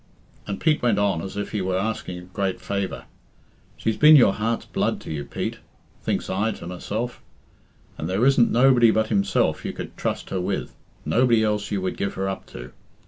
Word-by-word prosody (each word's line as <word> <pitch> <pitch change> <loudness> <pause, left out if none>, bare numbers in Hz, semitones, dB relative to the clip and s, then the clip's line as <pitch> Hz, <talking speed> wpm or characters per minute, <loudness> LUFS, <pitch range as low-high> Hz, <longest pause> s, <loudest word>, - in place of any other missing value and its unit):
And 100 -2 -4
Pete 155 -1 +2
went 120 -4 +2
on 100 -5 +1
as 95 +3 -7
if 105 - -3
he 105 - -1
were 95 0 0
asking 95 -3 -3
a - - -8
great 95 +1 -3
favour. 100 -1 -3 0.7
"'She's 110 - -1
been 155 +1 +8
your 120 -8 +6
heart's 115 +2 -2
blood - - -1
to - - -8
you, 75 -2 -3
Pete,' - - -4 0.4
thinks - - -2
I 100 +4 0
to - - -10
my. 90 +1 -7
self, 120 +4 -4 0.8
'and 80 - -3
there 100 +6 +2
isn't 135 -3 +4
nobody 125 -1 +5
but 110 0 +1
himself 100 -3 +1
you - - -4
could - - -7
trust - - -3
her 95 - -1
with 90 - -3 0.3
nobody 120 -2 +3
else 105 -1 0
you 100 -2 -1
would 95 - -2
give 100 - -2
her 95 0 -2
up 95 - -5
to. 60 +1 -10
100 Hz, 200 wpm, -24 LUFS, 95-115 Hz, 0.8 s, been